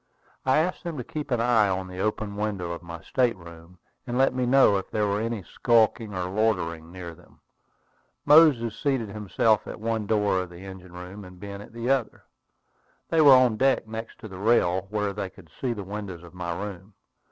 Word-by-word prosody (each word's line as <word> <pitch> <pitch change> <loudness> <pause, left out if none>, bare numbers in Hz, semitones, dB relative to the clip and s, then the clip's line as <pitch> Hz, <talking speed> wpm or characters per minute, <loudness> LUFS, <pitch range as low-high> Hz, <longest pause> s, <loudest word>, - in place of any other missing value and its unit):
I 130 - +4
asked 175 +4 0
them 170 -3 -5
to 125 - -4
keep 150 +4 -6
an 120 -3 +1
eye 115 -3 +3
on 95 0 -2
the 90 0 -8
open 105 0 -2
windows 100 -5 -2
of 85 - -7
my 85 -1 -9
state 125 -5 +1
room, 85 0 -13 0.3
and 120 0 -2
let 135 0 +3
me 125 -1 -1
know 130 -6 +5
if 95 - -5
there 105 -1 0
were 100 +1 0
any 115 -3 -3
skulking 110 +2 +2
or 90 -1 -2
loitering 90 -5 -1
near 90 -2 -8
them. - - -20 0.9
Moses 145 -7 +6
seated 130 -6 -1
himself 105 +1 +1
at - - -7
one 110 -1 -2
door 105 -3 +2
of 90 -1 -4
the 90 +2 -11
engine 95 -2 -10
room, 90 +3 -9
and 90 -1 -13
Ben 100 +1 -7
at - - -12
the 115 +3 -2
other. 130 -4 -1 0.9
They 165 - +3
were 140 -3 +9
on 125 -4 +4
deck, 135 -3 +2
next 110 +1 -7
to - - -7
the 95 -3 -9
rail, 95 -4 +2
where 105 -1 -1
they 100 -1 -4
could 90 -4 -18
see 130 - 0
the 105 -4 -4
windows 95 -3 -6
of 85 -1 -13
my 90 -1 -4
room. 100 0 -7
105 Hz, 210 wpm, -26 LUFS, 90-115 Hz, 0.9 s, were